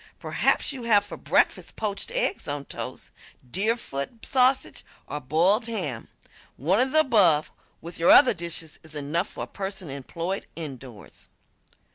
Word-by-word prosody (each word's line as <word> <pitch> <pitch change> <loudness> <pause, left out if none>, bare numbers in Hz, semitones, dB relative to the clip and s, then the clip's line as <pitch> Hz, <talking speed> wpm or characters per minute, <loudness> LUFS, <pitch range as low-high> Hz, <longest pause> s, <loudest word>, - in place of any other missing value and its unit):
Perhaps - - +1
you 265 - -6
have 210 -3 +3
for - - -8
breakfast - - +1
poached 210 - -3
eggs - - -1
on 145 -1 -4
toast, - - -6 0.4
Deerfoot 205 - -2
sausage 260 0 +2 0.2
or 150 - -5
boiled 180 - +2
ham. 155 - -4 0.5
One 175 - +1
of 260 +1 +2
the 310 - +6
above, 185 - +3 0.3
with 170 +1 -8
your 170 - +3
other 260 - +8
dishes, 170 -3 -3
is 160 -1 -12
enough 150 +5 -1
for - - -7
a - - -4
person 190 -5 -6
employed 165 +7 -4
indoors. 130 -9 -9
175 Hz, 145 wpm, -25 LUFS, 150-225 Hz, 0.5 s, other